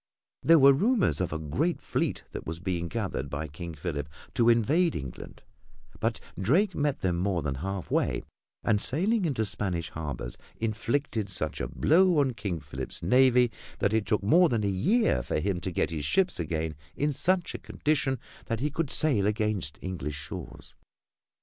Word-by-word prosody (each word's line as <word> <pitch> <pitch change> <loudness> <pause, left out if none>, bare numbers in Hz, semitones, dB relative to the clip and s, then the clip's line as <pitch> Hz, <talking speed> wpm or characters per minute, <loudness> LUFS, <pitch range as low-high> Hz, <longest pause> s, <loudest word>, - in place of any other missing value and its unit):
There 165 0 +6
were 140 -1 +8
rumors 215 - +2
of 90 - -1
a 80 - -1
great 125 - -1
fleet - - -2
that - - -7
was 80 +1 -4
being 90 -2 -2
gathered 70 -3 -3
by 70 +3 -3
King 85 +3 -7
Philip 75 -1 -4 0.2
to 115 -1 +4
invade 150 - +3
England, 65 -5 -7 0.6
but - - 0 0.2
Drake 175 - +3
met 145 -3 0
them 90 -2 +1
more 90 -3 0
than 70 -2 -1
half 95 +6 -4
way - - +1 0.4
and 105 -1 +2
sailing 195 - +1
into 130 -9 0
Spanish 90 -5 -3
harbors 70 -7 -5 0.2
inflicted 115 0 -1
such 80 -5 -2
a - - -1
blow 175 - +4
on 135 -3 +3
King 100 -6 -3
Philip's 65 0 -7
navy 125 +4 +5 0.3
that 100 - +1
it 110 -2 +1
took 105 -3 +1
more 170 - +5
than 115 -5 0
a - - +1
year 130 - +2
for 60 - -1
him 95 +1 -1
to 95 - -3
get 85 - 0
his 75 -3 -3
ships 185 - +1
again 80 -1 -2 0.2
in 145 0 0
such 180 +4 +1
a - - -5
condition 145 -3 0 0.3
that 115 -2 -1
he 145 +4 -1
could 160 0 -1
sail 125 -12 +2
against 105 -8 -1
English 80 -6 -4
shores. - - -8
105 Hz, 175 wpm, -28 LUFS, -, 0.6 s, were